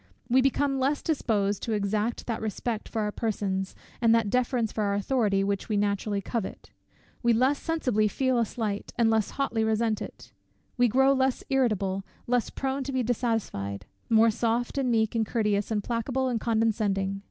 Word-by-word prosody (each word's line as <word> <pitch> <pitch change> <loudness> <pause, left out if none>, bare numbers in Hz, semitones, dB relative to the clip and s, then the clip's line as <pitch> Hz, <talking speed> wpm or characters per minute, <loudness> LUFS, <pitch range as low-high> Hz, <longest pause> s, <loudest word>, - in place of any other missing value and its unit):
We 255 +2 +4
become 275 +1 +1
less 275 +3 0
disposed 210 -10 0
to 225 - -2
exact 210 +2 -1
that 230 -2 -3
respect 220 +1 -3
for 220 - -1
our 210 - -1
persons, 195 -4 -2 0.3
and 230 -1 +5
that 225 -3 +1
deference 250 -3 +1
for 215 - -2
our 200 0 +1
authority, 205 -2 +1
which 200 +1 -2
we 210 - +1
naturally 200 0 0
covet; 225 -2 -4 0.5
we 235 -1 +3
less 260 +5 +2
sensibly 250 -10 +1
feel 260 +3 +1
a 230 - +3
slight, 210 -3 -4
and 230 -2 +4
less 220 -2 +2
hotly 240 -5 -1
resent 220 0 +1
it; - - -9 0.4
we 245 -1 +4
grow 265 +4 +4
less 265 -1 +1
irritable, 205 -7 +1 0.2
less 245 -2 +1
prone 270 0 -2
to 275 - -3
be 260 -1 0
dissatisfied; 215 - -2 0.2
more 225 0 +5
soft, 235 +4 -1
and 260 -2 +1
meek, 220 -2 +2
and 225 -2 0
courteous, 210 -3 0
and 210 -2 -1
placable, 250 +3 -1
and 235 -2 -1
condescending. 210 -4 0
225 Hz, 175 wpm, -27 LUFS, 205-250 Hz, 0.5 s, and